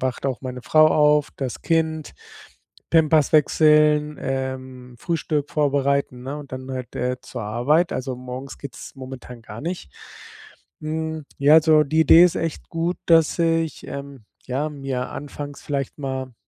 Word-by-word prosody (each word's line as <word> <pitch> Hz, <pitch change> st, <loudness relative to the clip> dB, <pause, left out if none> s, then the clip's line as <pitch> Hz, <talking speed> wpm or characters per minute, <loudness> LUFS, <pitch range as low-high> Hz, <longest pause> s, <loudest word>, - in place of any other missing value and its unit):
wacht 130 Hz, +1 st, -2 dB
auch 130 Hz, -2 st, -2 dB
meine 125 Hz, -2 st, -6 dB
Frau 155 Hz, 0 st, +5 dB
auf, 150 Hz, -1 st, +3 dB
das 130 Hz, -3 st, -5 dB
Kind 160 Hz, -, 0 dB, 0.8 s
Pampers 160 Hz, -2 st, +4 dB
wechseln, 150 Hz, 0 st, +4 dB
ähm, 130 Hz, -2 st, -5 dB
Frühstück 150 Hz, -3 st, -2 dB
vorbereiten, 140 Hz, -3 st, 0 dB
ne? 135 Hz, +3 st, -5 dB
Und 140 Hz, -3 st, -11 dB
dann 130 Hz, 0 st, -6 dB
halt, 130 Hz, -1 st, -6 dB
äh, 125 Hz, +1 st, -1 dB
zur 125 Hz, -2 st, -7 dB
Arbeit. 130 Hz, +11 st, +1 dB
Also, 130 Hz, -1 st, -3 dB
morgens 130 Hz, +2 st, -8 dB
geht's 140 Hz, -4 st, -9 dB
momentan 130 Hz, -2 st, -9 dB
gar 125 Hz, -, -9 dB
nicht. 170 Hz, -, -5 dB, 0.9 s
Hm, 160 Hz, 0 st, -4 dB
ja, 145 Hz, +2 st, +6 dB
also 155 Hz, -1 st, +6 dB
die 160 Hz, +3 st, +1 dB
Idee 160 Hz, +3 st, +8 dB
ist 180 Hz, -, +3 dB
echt 165 Hz, -2 st, -4 dB
gut, 170 Hz, +2 st, -2 dB
dass 165 Hz, 0 st, +4 dB
ich, 165 Hz, -2 st, 0 dB
ähm, 140 Hz, -4 st, -8 dB, 0.2 s
ja, 135 Hz, +4 st, -2 dB
mir 135 Hz, -3 st, -4 dB
anfangs 145 Hz, 0 st, -7 dB
vielleicht 140 Hz, -2 st, -3 dB
mal 130 Hz, -3 st, -4 dB
140 Hz, 150 wpm, -22 LUFS, 130-155 Hz, 0.9 s, Idee